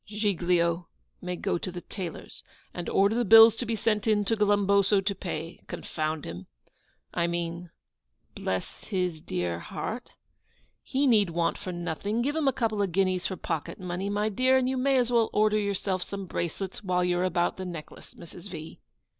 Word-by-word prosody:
'Giglio 180 -5 +1 0.3
may 180 0 -3
go 175 - -1
to 185 - -5
the 175 0 -6
tailor's, 180 -3 -7 0.3
and 175 - -4
order 200 +2 +3
the 240 +1 +1
bills 225 +1 +9
to 240 - -3
be 230 - 0
sent 215 0 0
in 210 -2 +3
to 225 - +2
Glumboso 200 -1 +3
to 195 +1 -1
pay. 165 -3 -6
Confound 155 -1 -3
him! 85 +2 -7 0.7
I 170 0 +1
mean 170 0 -3 0.6
bless 95 -1 -4
his 180 -6 -2
dear 90 - -2
heart. - - -5 0.7
He 275 +2 0
need 215 -7 +4
want 170 0 0
for 185 - -5
nothing; 175 +6 -2
give 290 +4 -1
him 315 -3 +1
a - - +5
couple 225 -5 -1
of 195 -3 0
guineas 185 0 +1
for 190 - -5
pocket 165 +2 -4
money, 180 +2 -3
my 205 +1 0
dear; 255 +5 +3
and 255 -1 +1
you 260 - 0
may 265 +1 +2
as 245 -1 +2
well 230 -2 +3
order 215 0 +3
yourself 195 -2 -1 0.2
bracelets 185 +3 -4
while 180 -2 +1
you 175 0 +1
are - - +1
about 175 -1 +1
the 190 - -5
necklace, 170 -4 -9
Mrs. 175 +3 -11
V. 155 -3 -8
190 Hz, 180 wpm, -28 LUFS, 175-215 Hz, 0.7 s, bills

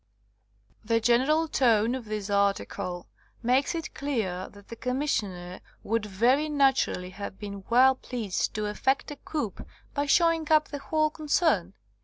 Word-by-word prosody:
The 230 +1 +2
general 260 +8 +3
tone 235 -5 +3
of 260 -3 -5
this 210 -1 -4
article 200 -3 -1 0.4
makes 255 +7 +2
it 325 -2 -5
clear 215 -10 -2
that 205 -1 -17
the 230 - -7
Commissioner 210 -9 -2 0.2
would 225 -1 -1
very 250 +10 +2
naturally 270 -10 +1
have 195 0 -7
been 200 -2 -8
well 255 +3 +6
pleased 235 -7 -3
to 215 0 -1
effect 265 +8 0
a - - -5
coup 285 -11 -3 0.4
by 285 -1 -1
showing 330 0 +3
up 305 -1 +4
the 285 - -5
whole 310 +2 0
concern. 295 - +1
240 Hz, 145 wpm, -27 LUFS, 200-285 Hz, 0.4 s, well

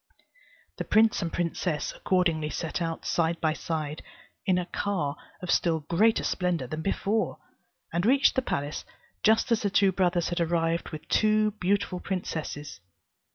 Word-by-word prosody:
The - - -2
prince 220 0 +4
and 170 -2 -2
princess 170 -2 -1
accordingly 165 -5 +1
set 165 +2 -3
out 165 -1 -3
side 165 0 +1
by 155 -1 +1
side, 155 -2 -4 0.5
in 185 -1 +4
a 180 - -1
car 175 -6 -2 0.3
of 180 - -1
still 165 -2 +2
greater 205 +9 +2
splendour 175 -8 0
than 155 +5 -4
before, 200 +2 0 0.6
and 170 +1 +1
reached 270 +6 +4
the 260 - +1
palace 145 - -3 0.4
just 220 +3 +3
as 230 - +3
the 205 - +1
two 195 0 +4
brothers 175 -2 +1
had 175 0 -1
arrived 165 0 0
with 155 -2 -8
two 215 0 +3
beautiful 200 -2 0
princesses. 155 - -4
175 Hz, 155 wpm, -27 LUFS, 160-200 Hz, 0.6 s, prince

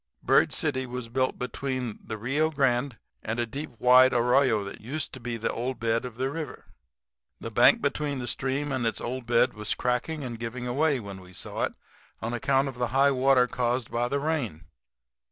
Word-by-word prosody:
Bird - - +4
City 130 -4 -1
was 125 -1 -6
built 130 +2 0
between 125 -1 -3
the 110 - -5
Rio 140 +8 +1
Grande 135 -4 +1 0.2
and 110 +2 -3
a 120 - +1
deep 140 +7 -6
wide 130 +2 +6
arroyo 125 -2 +3
that 100 - -8
used 130 +5 -4
to 130 - -7
be 120 -1 -4
the 115 - -2
old 125 +1 -3
bed 115 +1 0
of 120 -2 -8
the 130 +1 -1
river. 155 0 -6 0.7
The - - -6
bank - - +5
between 145 -2 -1
the 125 - -4
stream 135 +4 -1
and 130 -3 0
its 115 - -2
old 125 0 -4
bed 120 +1 +3
was 105 -1 -2
cracking 125 +5 -1
and 120 -3 -5
giving 120 +1 -5
away, 140 +3 +1
when 100 -3 -8
we 90 0 -15
saw - - -2
it, - - -7 0.4
on 115 +3 -3
account 135 +3 +2
of 130 -2 -7
the 125 - +1
high 135 +3 +4
water 130 -1 +4
caused 125 0 -1
by 120 +1 0
the 140 +3 -1
rain. 140 - -2
125 Hz, 200 wpm, -27 LUFS, 115-135 Hz, 0.7 s, wide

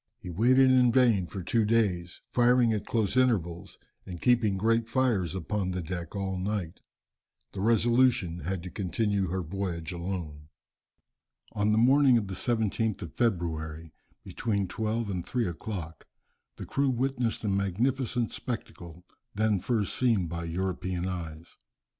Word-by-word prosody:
He 90 - -8
waited 130 +8 +4
in 125 -2 +5
vain 115 -7 +3
for 95 +3 -6
two 115 +6 +1
days, 100 -6 0
firing 120 -1 +4
at 105 - -3
close 110 -2 0
intervals 95 -10 0 0.3
and 90 -2 -8
keeping 115 -4 +2
great 115 +3 +1
fires 110 - +1
upon 95 +2 -2
the 90 -1 -3
deck 85 +1 -6
all 95 -1 -2
night. 95 -3 -3 0.7
The 95 - -5
Resolution 115 -5 +3
had 90 +2 -4
to 90 - -7
continue 100 +1 -1
her 90 +2 -2
voyage 85 -1 -4
alone. 85 -4 -5 1.0
On 105 +1 +1
the 105 - +3
morning 130 +2 +5
of 110 - -1
the 95 - -6
17th 110 0 -1
of 80 - -8
February, 80 -7 -2 0.3
between 100 -4 -2
twelve 110 +3 -2
and 90 -3 -3
three 120 +5 -1
o'clock, 85 -2 -6 0.5
the - - -7
crew 140 0 0
witnessed 125 -2 -1
a - - -1
magnificent 115 +5 0
spectacle, 90 -8 -7 0.3
then 105 -1 +2
first 105 0 -1
seen 115 -8 +2
by 85 0 -5
European 90 +1 -2
eyes. 85 -3 -7
100 Hz, 145 wpm, -28 LUFS, 90-115 Hz, 1.0 s, in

